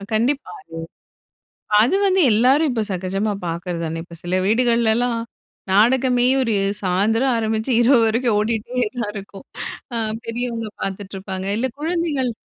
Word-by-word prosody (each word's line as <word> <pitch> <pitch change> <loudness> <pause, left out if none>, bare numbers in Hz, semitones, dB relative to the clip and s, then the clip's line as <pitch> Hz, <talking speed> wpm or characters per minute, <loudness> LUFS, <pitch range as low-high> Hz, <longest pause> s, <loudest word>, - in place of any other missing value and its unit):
அ - - -12
கண்டிப்பா. 265 +6 0 1.3
அது 255 - +3
வந்து 380 -1 +3
எல்லாரும் 260 +8 +4
இப்போ 225 -3 0
சகஜமா 190 +3 -1 0.2
பாக்குறது 170 +1 -4
தானே! 165 +1 -4
இப்போ 170 -1 -13
சில 180 +1 -1
வீடுகள்லலாம், 235 +1 +2 0.5
நாடகமே 245 +4 +4 0.2
ஒரு 230 -4 +1 0.3
சாயந்திரம் 220 +8 +2
ஆரம்பிச்சு 220 +2 -1
இரவு 245 +1 +5
வரைக்கும் 230 0 +1
ஓடிகிட்டே 230 +3 -1
தான் 220 -4 -2
இருக்கும். 200 +5 -9 0.5
அ - - 0 0.3
பெரியவங்க 230 -1 -3
பாத்துட்டுருப்பாங்க, 190 -1 -5
இல்ல 260 +3 0
குழந்தைகள் 310 -6 -1
230 Hz, 125 wpm, -21 LUFS, 200-250 Hz, 1.3 s, இரவு